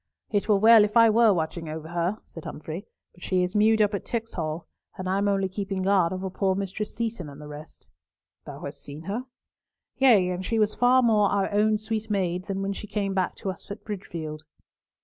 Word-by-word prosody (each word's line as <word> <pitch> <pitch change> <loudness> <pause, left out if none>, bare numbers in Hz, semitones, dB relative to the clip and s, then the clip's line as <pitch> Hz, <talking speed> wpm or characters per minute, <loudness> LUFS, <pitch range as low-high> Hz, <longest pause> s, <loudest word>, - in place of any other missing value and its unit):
"It 205 0 0
were 210 - +5
well 220 +1 +7
if 210 +2 +1
I 230 -1 +7
were 225 0 +5
watching 165 -2 -2
over 160 0 -6
her," 175 +4 -1
said 165 - -11
Humfrey, 160 +6 -7 0.3
"but 175 - -21
she 185 -1 +1
is 180 +2 -3
mewed 215 +1 +5
up 205 0 0
at 200 - -2
Tixall, 175 -9 -4 0.3
and 185 - -4
I 190 +1 +1
am 200 - +1
only 195 -1 +1
keeping 195 0 -3
guard 190 -3 +3
over 185 +1 -3
poor 190 0 +1
Mistress 200 +2 -4
Seaton 225 -8 -3
and 140 0 -11
the 150 - -9
rest." 150 +1 -11 0.6
"Thou - - -9
hast - - -7
seen 145 +2 -9
her?" 215 +8 -4 0.7
"Yea, 225 -9 +5
and 180 +1 -3
she 225 +4 -1
was 215 -1 +2
far 255 +1 +4
more 210 -4 +4
our 200 -1 0
own 215 +1 +3
sweet 220 0 -4
maid 185 -3 -1
than 195 -1 -3
when 200 0 -1
she 210 - -8
came 200 -1 -2
back 185 -1 0
to 195 - -3
us 185 - -12
at 200 +2 -7
Bridgefield." 165 -7 -6
195 Hz, 215 wpm, -26 LUFS, 180-215 Hz, 0.7 s, well